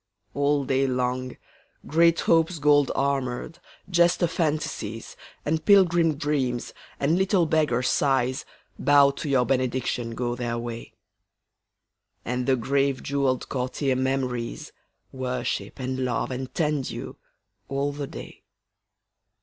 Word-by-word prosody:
All 145 Hz, 0 st, +1 dB
day 135 Hz, 0 st, +1 dB
long 125 Hz, 0 st, -2 dB, 0.5 s
Great 170 Hz, +2 st, +3 dB
Hopes 165 Hz, +1 st, +2 dB
gold 145 Hz, -1 st, +4 dB
armoured, 140 Hz, +3 st, -2 dB, 0.3 s
jester 175 Hz, -1 st, +3 dB
Fantasies, 150 Hz, -, -3 dB, 0.3 s
And 160 Hz, +1 st, 0 dB
pilgrim 175 Hz, -5 st, +4 dB
Dreams, 135 Hz, -5 st, -1 dB, 0.3 s
and 155 Hz, +6 st, +2 dB
little 190 Hz, -2 st, +3 dB
beggar 150 Hz, -6 st, +1 dB
Sighs, 130 Hz, 0 st, +1 dB, 0.4 s
Bow 140 Hz, 0 st, +5 dB
to 140 Hz, +1 st, -6 dB
your 130 Hz, -3 st, +3 dB
benediction, 125 Hz, -2 st, -1 dB
go 120 Hz, 0 st, -2 dB
their 120 Hz, -1 st, -3 dB
way. 115 Hz, -1 st, -6 dB, 1.3 s
And 125 Hz, +1 st, -2 dB
the 135 Hz, -, +4 dB
grave 135 Hz, +2 st, 0 dB
jewelled 135 Hz, -2 st, 0 dB
courtier 130 Hz, +1 st, -1 dB
Memories 130 Hz, -2 st, -2 dB, 0.4 s
Worship 130 Hz, -1 st, -3 dB
and 130 Hz, 0 st, -3 dB
love 130 Hz, 0 st, -1 dB
and 130 Hz, 0 st, -5 dB
tend 150 Hz, -4 st, 0 dB
you, -, -, -7 dB, 0.5 s
all 140 Hz, +1 st, -1 dB
the 145 Hz, -1 st, -5 dB
day. -, -, -10 dB
135 Hz, 115 wpm, -25 LUFS, 125-150 Hz, 1.3 s, Bow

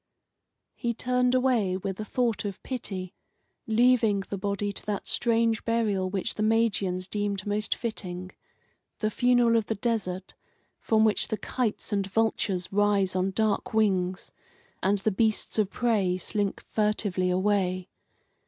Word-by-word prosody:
He 235 Hz, -1 st, -2 dB
turned 250 Hz, +1 st, +1 dB
away 240 Hz, -8 st, +2 dB
with 195 Hz, 0 st, -4 dB
a -, -, -2 dB
thought 235 Hz, -1 st, 0 dB
of 200 Hz, -2 st, -6 dB
pity, 190 Hz, -8 st, -5 dB, 0.5 s
leaving 225 Hz, -2 st, +3 dB
the 195 Hz, +1 st, -5 dB
body 200 Hz, +1 st, -1 dB
to -, -, -6 dB
that 205 Hz, -2 st, -2 dB
strange 230 Hz, -1 st, +1 dB
burial 215 Hz, -5 st, 0 dB
which 195 Hz, +3 st, -2 dB
the -, -, -5 dB
Magians 215 Hz, -5 st, +1 dB
deemed 205 Hz, -2 st, -2 dB
most 210 Hz, +1 st, 0 dB
fitting 185 Hz, -5 st, -5 dB, 0.7 s
the 215 Hz, 0 st, -1 dB
funeral 245 Hz, 0 st, +3 dB
of 220 Hz, -, -1 dB
the 220 Hz, -, -1 dB
desert, 195 Hz, -4 st, -2 dB, 0.5 s
from 220 Hz, -1 st, +3 dB
which 215 Hz, -, +1 dB
the 215 Hz, -, -2 dB
kites 225 Hz, -3 st, -2 dB
and 200 Hz, -1 st, 0 dB
vultures 195 Hz, -3 st, 0 dB
rise 200 Hz, -2 st, +2 dB
on 185 Hz, +1 st, +1 dB
dark 215 Hz, +2 st, 0 dB
wings, 185 Hz, -4 st, +1 dB, 0.5 s
and 200 Hz, +2 st, +2 dB
the 200 Hz, +2 st, 0 dB
beasts 220 Hz, +2 st, +1 dB
of 205 Hz, -3 st, +2 dB
prey 200 Hz, -6 st, +1 dB
slink 200 Hz, +1 st, -2 dB
furtively 210 Hz, -4 st, +1 dB
away. 185 Hz, -1 st, +1 dB
205 Hz, 145 wpm, -27 LUFS, 190-225 Hz, 0.7 s, leaving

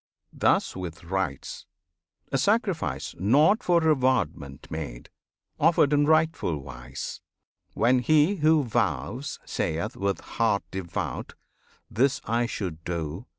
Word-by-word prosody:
Thus -, -, +2 dB
with 90 Hz, -3 st, -7 dB
rites; 90 Hz, -5 st, -3 dB, 0.6 s
A 135 Hz, -, +1 dB
sacrifice 185 Hz, -, 0 dB
not 145 Hz, -, +4 dB
for 175 Hz, -1 st, +3 dB
rewardment 125 Hz, -, 0 dB
made, 70 Hz, -7 st, -6 dB, 0.5 s
Offered 150 Hz, -2 st, +4 dB
in 145 Hz, 0 st, +3 dB
rightful 155 Hz, -, +2 dB
wise, 65 Hz, -2 st, -7 dB, 0.5 s
when 125 Hz, +1 st, +3 dB
he 155 Hz, -, +3 dB
who 155 Hz, -1 st, +4 dB
vows 110 Hz, -, -2 dB
Sayeth, 80 Hz, +1 st, -2 dB
with 100 Hz, 0 st, -1 dB
heart 110 Hz, -4 st, 0 dB
devout, 90 Hz, -3 st, -4 dB, 0.5 s
"This 135 Hz, +4 st, +1 dB
I 115 Hz, +1 st, +1 dB
should 90 Hz, -8 st, -5 dB
do!" 85 Hz, -, -4 dB
110 Hz, 110 wpm, -26 LUFS, -, 0.6 s, not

